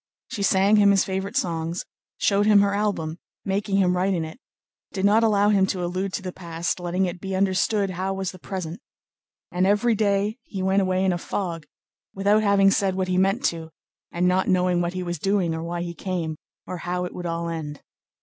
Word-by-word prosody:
She 205 Hz, -, -4 dB
sang 195 Hz, +2 st, +4 dB
him 205 Hz, -1 st, +6 dB
his 195 Hz, -1 st, +4 dB
favorite 190 Hz, +3 st, -3 dB
songs, 165 Hz, 0 st, -2 dB, 0.3 s
showed 205 Hz, +1 st, +2 dB
him 210 Hz, -2 st, +6 dB
her 200 Hz, 0 st, +2 dB
album, 185 Hz, -6 st, -1 dB, 0.3 s
making 195 Hz, 0 st, 0 dB
him 180 Hz, -2 st, +3 dB
write 190 Hz, +2 st, +1 dB
in 165 Hz, -2 st, -1 dB
it, 160 Hz, +10 st, -10 dB, 0.5 s
did 195 Hz, -1 st, -1 dB
not 210 Hz, +3 st, +5 dB
allow 205 Hz, -2 st, +3 dB
him 195 Hz, -2 st, +3 dB
to 185 Hz, -2 st, -2 dB
allude 185 Hz, +2 st, -2 dB
to 195 Hz, -, -3 dB
the 185 Hz, -, -4 dB
past, 170 Hz, 0 st, -3 dB
letting 180 Hz, +2 st, 0 dB
it 175 Hz, -1 st, -5 dB
be 195 Hz, 0 st, -3 dB
understood 195 Hz, +1 st, +1 dB
how 185 Hz, +1 st, -4 dB
delightful 195 Hz, 0 st, -2 dB
was 190 Hz, -1 st, -2 dB
the 185 Hz, -, -13 dB
present; 180 Hz, -2 st, -5 dB, 0.7 s
and 180 Hz, +1 st, +1 dB
every 210 Hz, +4 st, +3 dB
day 205 Hz, +2 st, 0 dB
he 195 Hz, -5 st, -6 dB
went 190 Hz, +1 st, +3 dB
away 185 Hz, 0 st, +1 dB
in 185 Hz, -, +2 dB
a 175 Hz, -, -3 dB
fog, 165 Hz, -4 st, -4 dB, 0.5 s
without 200 Hz, +2 st, +3 dB
having 200 Hz, -2 st, +4 dB
said 195 Hz, -1 st, +1 dB
what 185 Hz, -1 st, -1 dB
he 185 Hz, 0 st, +2 dB
meant 195 Hz, +7 st, +1 dB
to, 165 Hz, -1 st, -1 dB, 0.4 s
and 175 Hz, +1 st, +1 dB
not 185 Hz, +1 st, +2 dB
knowing 180 Hz, -1 st, +2 dB
what 175 Hz, +1 st, -2 dB
he 185 Hz, 0 st, -3 dB
was 175 Hz, -2 st, -4 dB
doing 195 Hz, -2 st, +1 dB
or 160 Hz, -, -4 dB
why 170 Hz, +1 st, -3 dB
he 170 Hz, -1 st, -5 dB
came, 170 Hz, -3 st, -3 dB, 0.3 s
or 180 Hz, -, -5 dB
how 180 Hz, +1 st, -3 dB
it 180 Hz, -, -7 dB
would 175 Hz, -1 st, -5 dB
all 170 Hz, 0 st, -2 dB
end. 155 Hz, -3 st, -5 dB
190 Hz, 215 wpm, -24 LUFS, 175-200 Hz, 0.7 s, him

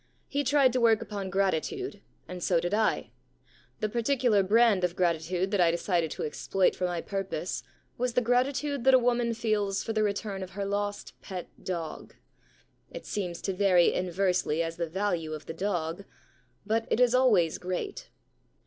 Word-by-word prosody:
He 285 Hz, 0 st, -1 dB
tried 275 Hz, -3 st, +4 dB
to 255 Hz, -, +1 dB
work 225 Hz, -2 st, +5 dB
upon 200 Hz, -2 st, -5 dB
gratitude, 195 Hz, -, -1 dB, 0.3 s
and 180 Hz, -1 st, -7 dB
so 175 Hz, -3 st, +3 dB
did 175 Hz, +3 st, -2 dB
1. 215 Hz, 0 st, +1 dB, 0.7 s
The 215 Hz, -, 0 dB
particular 235 Hz, -2 st, +2 dB
brand 210 Hz, 0 st, +4 dB
of 180 Hz, -1 st, 0 dB
gratitude 175 Hz, +2 st, 0 dB
that 200 Hz, -3 st, +2 dB
I 170 Hz, -, +5 dB
decided 170 Hz, -1 st, 0 dB
to -, -, -5 dB
exploit 185 Hz, +5 st, 0 dB
for 180 Hz, -, -1 dB
my 175 Hz, -2 st, -2 dB
purpose 195 Hz, -3 st, -3 dB, 0.4 s
was 250 Hz, -1 st, 0 dB
the 250 Hz, -, +3 dB
gratitude 260 Hz, +3 st, 0 dB
that 265 Hz, 0 st, +7 dB
a -, -, +8 dB
woman 240 Hz, -1 st, +1 dB
feels 210 Hz, -3 st, 0 dB
for 225 Hz, -, -3 dB
the 215 Hz, -, +1 dB
return 200 Hz, -1 st, -2 dB
of 185 Hz, 0 st, -7 dB
her 200 Hz, -, -1 dB
lost 205 Hz, +1 st, -3 dB
pet 185 Hz, -3 st, -7 dB
dog. 170 Hz, -4 st, -5 dB, 0.7 s
It -, -, -9 dB
seems 180 Hz, -4 st, -4 dB
to 195 Hz, -, -1 dB
vary 185 Hz, -2 st, +4 dB
inversely 180 Hz, -3 st, 0 dB
as 165 Hz, 0 st, -5 dB
the 170 Hz, -1 st, -2 dB
value 175 Hz, -4 st, -1 dB
of 155 Hz, 0 st, -7 dB
the -, -, -6 dB
dog, 175 Hz, 0 st, -2 dB, 0.6 s
but 225 Hz, +2 st, 0 dB
it -, -, +1 dB
is 250 Hz, -1 st, +4 dB
always 215 Hz, -11 st, +3 dB
great. 180 Hz, 0 st, -4 dB
195 Hz, 175 wpm, -28 LUFS, 180-230 Hz, 0.7 s, a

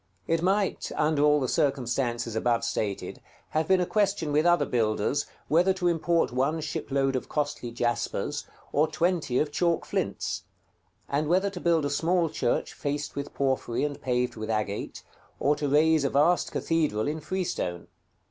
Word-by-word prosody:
It 165 Hz, 0 st, +1 dB
might, 195 Hz, +2 st, 0 dB
under 150 Hz, -1 st, +2 dB
all 150 Hz, 0 st, +5 dB
the 130 Hz, -, -1 dB
circumstances 125 Hz, -5 st, 0 dB
above 115 Hz, 0 st, +1 dB
stated, 110 Hz, -4 st, -3 dB, 0.3 s
have 155 Hz, 0 st, 0 dB
been 190 Hz, -1 st, +4 dB
a 180 Hz, -, +2 dB
question 200 Hz, -6 st, 0 dB
with 155 Hz, +3 st, +3 dB
other 175 Hz, -4 st, +4 dB
builders, 115 Hz, +3 st, 0 dB, 0.2 s
whether 175 Hz, +4 st, +4 dB
to 185 Hz, -1 st, -1 dB
import 170 Hz, -3 st, +2 dB
one 135 Hz, +6 st, 0 dB
shipload 135 Hz, -2 st, -1 dB
of 130 Hz, -, -3 dB
costly 145 Hz, -5 st, -2 dB
jaspers, 120 Hz, 0 st, -2 dB, 0.3 s
or 150 Hz, +2 st, +3 dB
twenty 165 Hz, -8 st, 0 dB
of 150 Hz, +1 st, +1 dB
chalk 170 Hz, +1 st, +1 dB
flints; -, -, -2 dB, 0.7 s
and 145 Hz, +2 st, 0 dB
whether 190 Hz, +3 st, +2 dB
to 185 Hz, -, -6 dB
build 165 Hz, -3 st, +2 dB
a 145 Hz, -, -1 dB
small 165 Hz, +3 st, +1 dB
church 120 Hz, -, -1 dB
faced 145 Hz, 0 st, -3 dB
with 140 Hz, 0 st, -5 dB
porphyry 130 Hz, -3 st, 0 dB
and 145 Hz, -1 st, -3 dB
paved 125 Hz, -1 st, 0 dB
with 110 Hz, 0 st, -5 dB
agate, 105 Hz, -2 st, -3 dB, 0.4 s
or 145 Hz, +1 st, +3 dB
to 145 Hz, -1 st, -2 dB
raise 155 Hz, +1 st, +4 dB
a 140 Hz, -, +2 dB
vast 150 Hz, +7 st, +3 dB
cathedral 150 Hz, -10 st, 0 dB
in 155 Hz, +2 st, -2 dB
freestone. 155 Hz, -, -3 dB
145 Hz, 165 wpm, -27 LUFS, 125-165 Hz, 0.7 s, all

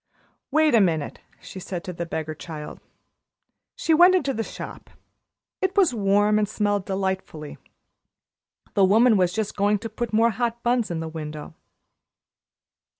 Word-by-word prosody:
"Wait 310 Hz, 0 st, +3 dB
a 230 Hz, -, +6 dB
minute," 160 Hz, -6 st, 0 dB, 0.2 s
she 180 Hz, +1 st, -10 dB
said 180 Hz, -1 st, -6 dB
to 185 Hz, -2 st, -6 dB
the 170 Hz, 0 st, -5 dB
beggar 160 Hz, -1 st, -4 dB
child. 155 Hz, -1 st, -8 dB, 1.0 s
She 325 Hz, -, +1 dB
went 355 Hz, +4 st, +7 dB
into 280 Hz, -7 st, 0 dB
the 225 Hz, -, -2 dB
shop. -, -, -8 dB, 0.7 s
It 380 Hz, +1 st, -1 dB
was 370 Hz, -10 st, +4 dB
warm 205 Hz, 0 st, +2 dB
and 210 Hz, -1 st, 0 dB
smelled 205 Hz, -2 st, -1 dB
delightfully. 190 Hz, -6 st, -4 dB, 1.1 s
The 200 Hz, -, +3 dB
woman 220 Hz, +5 st, +5 dB
was 180 Hz, -3 st, +2 dB
just 215 Hz, +1 st, -3 dB
going 205 Hz, +1 st, +2 dB
to 225 Hz, +2 st, -7 dB
put 235 Hz, +1 st, -4 dB
more 225 Hz, +2 st, +3 dB
hot 235 Hz, +2 st, -3 dB
buns 240 Hz, -2 st, +1 dB
in 165 Hz, -2 st, -3 dB
the 165 Hz, -, -4 dB
window. 155 Hz, -1 st, -7 dB
205 Hz, 150 wpm, -24 LUFS, 175-235 Hz, 1.1 s, went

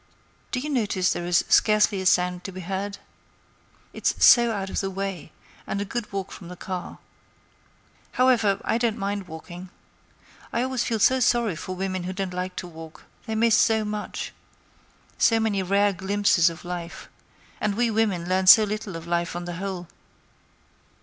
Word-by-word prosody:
Do 250 Hz, -, -1 dB
you 300 Hz, +4 st, -4 dB
notice 205 Hz, -8 st, +1 dB
there 175 Hz, -, -4 dB
is 175 Hz, -1 st, +2 dB
scarcely 210 Hz, -2 st, +3 dB
a 190 Hz, -, +1 dB
sound 180 Hz, -1 st, +2 dB
to 195 Hz, -, -5 dB
be 185 Hz, 0 st, -8 dB
heard? 195 Hz, +2 st, -4 dB, 1.0 s
It's -, -, 0 dB
so 235 Hz, -1 st, +7 dB
out 195 Hz, -3 st, -4 dB
of -, -, -1 dB
the 195 Hz, -, -2 dB
way; 195 Hz, -4 st, -5 dB, 0.4 s
and 200 Hz, -, -2 dB
a 200 Hz, -, -2 dB
good 235 Hz, +2 st, -5 dB
walk 195 Hz, -1 st, -4 dB
from 175 Hz, -, -10 dB
the 180 Hz, -, -8 dB
car. 180 Hz, 0 st, -6 dB, 1.2 s
However, 235 Hz, -6 st, +3 dB
I 230 Hz, -, +1 dB
don't 230 Hz, -2 st, 0 dB
mind 200 Hz, -1 st, -3 dB
walking. 175 Hz, +3 st, -9 dB, 0.8 s
I 235 Hz, -, 0 dB
always 260 Hz, -1 st, -1 dB
feel 225 Hz, -, -1 dB
so 260 Hz, +5 st, +4 dB
sorry 235 Hz, -6 st, +2 dB
for 185 Hz, +4 st, -6 dB
women 185 Hz, -1 st, -3 dB
who 185 Hz, -, -4 dB
don't 190 Hz, -1 st, -4 dB
like 180 Hz, +1 st, -4 dB
to 180 Hz, -, -5 dB
walk; 160 Hz, -1 st, -12 dB, 0.2 s
they 220 Hz, -, -2 dB
miss 230 Hz, 0 st, +4 dB
so 220 Hz, -1 st, +3 dB
much—so 210 Hz, +2 st, -4 dB
many 215 Hz, -3 st, 0 dB
rare 200 Hz, +2 st, +2 dB
little 190 Hz, 0 st, -9 dB
glimpses 200 Hz, -4 st, +3 dB
of 165 Hz, +1 st, -10 dB
life; 175 Hz, 0 st, -6 dB, 0.5 s
and 210 Hz, -1 st, -1 dB
we 235 Hz, +1 st, +1 dB
women 205 Hz, -6 st, 0 dB
learn 185 Hz, +1 st, 0 dB
so 215 Hz, +3 st, +10 dB
little 210 Hz, -2 st, -4 dB
of 165 Hz, 0 st, -7 dB
life 170 Hz, 0 st, -1 dB
on 175 Hz, 0 st, -5 dB
the 175 Hz, -1 st, -5 dB
whole. 185 Hz, -2 st, -5 dB
195 Hz, 175 wpm, -25 LUFS, 180-215 Hz, 1.2 s, so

